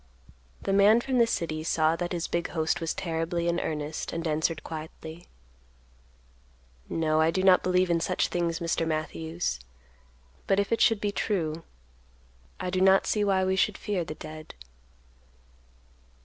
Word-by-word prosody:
The 195 - 0
man 205 +3 +6
from 255 0 0
the 235 - +5
city 155 -7 -2
saw 160 0 +2
that 175 0 -3
his 175 -2 -2
big 170 0 -1
host 160 +1 -1
was 165 - -1
terribly 170 0 -2
in 170 0 +1
earnest, 150 0 -3
and 165 0 -3
answered 160 +1 0
quietly, 160 +1 -8 1.6
"No, 155 -1 +1
I 160 - +4
do 185 +3 0
not 185 -1 +6
believe 180 0 +2
in 170 - +2
such - - 0
things, 170 -1 -1
Mr. 165 -1 -1
Matthews; 160 - -2 0.9
but 195 - +3
if 200 - -1
it 230 - +1
should 225 -3 +4
be 205 - 0
true, 165 -7 -1 1.0
I 180 - -3
do 185 0 0
not 190 0 +5
see 210 - +1
why 190 -2 +2
we 190 0 +1
should 190 - +1
fear 200 -5 -2
the 155 - -7
dead." 155 0 -10
170 Hz, 160 wpm, -27 LUFS, 160-190 Hz, 1.6 s, man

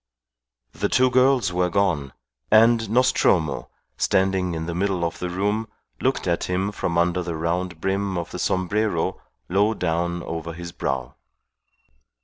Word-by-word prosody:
The - - -1
two 130 0 +3
girls 130 -7 +3
were 90 0 +1
gone, 85 -8 0 0.4
and 115 0 +5
Nostromo, 90 - +2 0.3
standing 95 -2 +1
in 80 0 -3
the 85 - -3
middle 90 -1 0
of 85 - -4
the 90 - -3
room, 105 +5 -1 0.3
looked - - 0
at - - 0
him 95 +3 -1
from 85 -4 -2
under 90 +1 +2
the 85 -2 -4
round 85 +2 -2
brim 95 +1 -1
of 85 - -4
the - - -6
sombrero 95 -1 0 0.3
low 100 +4 +2
down 85 -1 -1
over 85 0 -5
his 85 +1 -7
brow. 65 -5 -3
90 Hz, 145 wpm, -23 LUFS, 85-100 Hz, 0.4 s, and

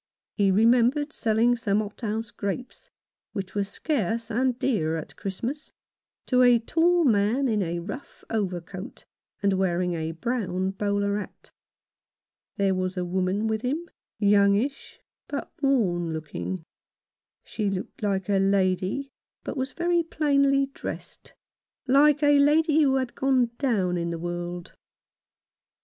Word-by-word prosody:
He 200 -2 +2
remembered 240 +8 +3
selling 230 +2 +2
some 210 -4 0
hothouse 220 +2 -4
grapes 200 +5 -5 0.2
— - - -69
which 195 -3 -5
were 205 - 0
scarce 230 - -2
and 250 +2 +1
dear 165 -13 0
at 160 - -8
Christmas 240 +10 -5 0.3
— - - -67
to 250 -1 +3
a 245 -1 +7
tall 335 +9 +2
man, 230 +3 +2
in 215 -3 +1
a 170 -2 -2
rough 205 +10 -8
overcoat, 190 0 -4 0.4
and 200 -1 +3
wearing 180 -1 0
a 160 -1 -3
brown 190 -1 -2
bowler 200 +1 0
hat. - - -10 1.1
There 195 -1 +2
was 185 0 -2
a 180 - -1
woman 185 +3 0
with 220 -1 -1
him, 300 +8 -2 0.3
youngish, 205 +5 +2 0.3
but 285 -1 -5
worn 185 - +1
looking. 160 +3 -5 0.8
She 210 -3 -2
looked 195 +2 -5
like 195 -3 -1
a 200 -1 +2
lady, 195 +6 +1 0.3
but - - -5
was 260 -1 -2
very 345 0 +1
plainly 280 -4 +2
dressed - - -8 0.3
— - - -68
like 290 +3 +5
a 290 -1 +5
lady 305 +2 +4
who 270 -3 +3
had 260 -2 -1
gone 260 -3 +2
down 195 -10 +1
in 170 0 -2
the 170 - -3
world. 175 +1 -5
215 Hz, 140 wpm, -26 LUFS, 190-265 Hz, 1.1 s, a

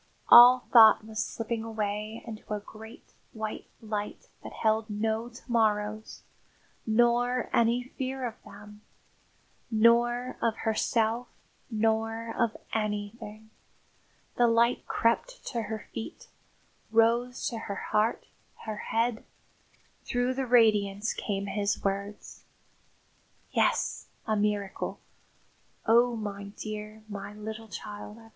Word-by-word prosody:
All 245 +1 +9
thought 220 -2 +8
was 220 0 -2
slipping 225 0 -4
away 215 0 -4
into 220 -2 -9
a - - -3
great 220 +2 -13 0.2
white 220 -1 -5 0.2
light 210 -1 -5
that - - -8
held 220 0 0
no 220 +2 -1
to 240 +1 -14
morrows, 215 -2 0 0.6
nor 240 +2 +2
any 235 +1 +3
fear 260 0 -4
of 230 -2 -6
them, 210 +1 -13 0.9
nor 240 +2 +3
of 230 -2 +1
herself, 225 +2 0 0.4
nor 225 0 0
of 235 -2 0 0.2
anything. 215 0 -4 0.9
The 240 - +5
light 235 +1 +2
crept - - 0
to 235 - -2
her 220 0 -6
feet, 230 +9 -7 0.6
rose 235 +2 +2
to 230 - -5
her 200 -3 -6
heart, 215 +2 +1 0.4
her 215 -1 -4
head. 230 +1 -1 0.8
Through 245 +1 0
the 265 0 -3
radiance 215 -3 +3
came 200 -2 -3
his 200 0 -1
words. 200 +1 -4 1.1
"Yes, - - +1 0.2
a 220 - 0
miracle. 205 -2 -2 0.9
Oh, 235 +1 +4
my 205 -2 -5
dear 215 0 -7
my 205 0 -7
little 220 +1 -7
child! 210 +2 -8
220 Hz, 110 wpm, -28 LUFS, 210-235 Hz, 1.1 s, All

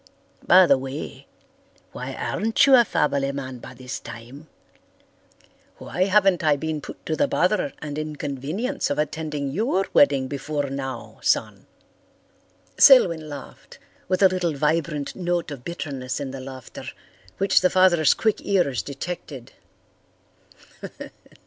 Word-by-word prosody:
By 185 +1 +8
the 140 -5 +4
way, 135 +3 -7 0.6
why - - -6
aren't 225 +1 +1
you 275 - +5
a 245 -2 +8
family 140 -8 0
man 130 -2 -6
by 130 - -11
this 130 +1 -6
time? 125 +7 -11 1.3
Why 180 +5 -1
haven't 195 -3 +3
I 150 -2 +4
been 155 +1 -4
put - - -11
to 160 - -1
the 285 - +2
bother 180 - +1
and 150 0 -4
inconvenience 155 - -3
of 145 - -1
attending 150 -2 -3
your 195 - 0
wedding 140 -2 +4
before 145 0 -3
now, 135 -3 -6
son?" - - 0 1.1
Selwyn 170 - +6
laughed, 145 -2 -11 0.3
with 185 +2 +1
a - - +9
little 180 -4 -1
vibrant 150 0 -1
note 175 -3 -2
of 135 -4 -8
bitterness 135 -6 -5
in 140 -2 -5
the 135 - -7
laughter, 130 -1 -9 0.5
which 195 -1 +3
the 180 - +4
father's 180 -5 +4
quick 220 -2 0
ears 175 - +1
detected. 140 - -7
150 Hz, 130 wpm, -23 LUFS, 135-180 Hz, 1.3 s, a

